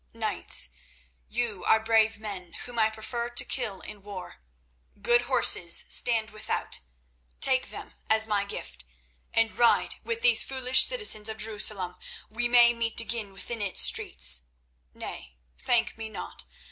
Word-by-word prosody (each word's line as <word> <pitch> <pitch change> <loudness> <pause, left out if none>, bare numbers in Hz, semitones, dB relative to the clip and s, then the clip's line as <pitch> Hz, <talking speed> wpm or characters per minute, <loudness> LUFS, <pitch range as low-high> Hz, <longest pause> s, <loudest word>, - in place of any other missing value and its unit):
Knights, - - -3 0.6
you 225 -6 -4
are 220 - +4
brave 220 -1 +1
men 195 -5 -7
whom 245 -1 -5
I 220 0 +2
prefer 235 +2 -6
to 240 - +1
kill 220 -7 -2
in 210 -1 -9
war. 195 -2 -10 0.6
Good 240 0 +2
horses 235 -9 +5
stand 225 -3 +2
without; 215 0 -4 0.6
take 260 -1 +2
them - - -10 0.2
as 220 0 +2
my 205 -2 -1
gift, 65 - -7 0.5
and 225 -3 0
ride 235 +2 +1
with 230 0 -3
these 235 -2 +5
foolish 260 -1 +4
citizens 420 - +3
of 220 - -6
Jerusalem. 210 -4 -1 0.3
We 240 +2 -2
may 240 0 +5
meet 230 -1 -2
again 225 -3 -1
within 215 +4 -5
its 200 -2 +1
streets. 60 0 +3 0.5
Nay, 65 -1 -10 0.2
thank 230 -1 -1
me 220 -1 -6
not. - - -6
220 Hz, 145 wpm, -26 LUFS, 205-235 Hz, 0.6 s, horses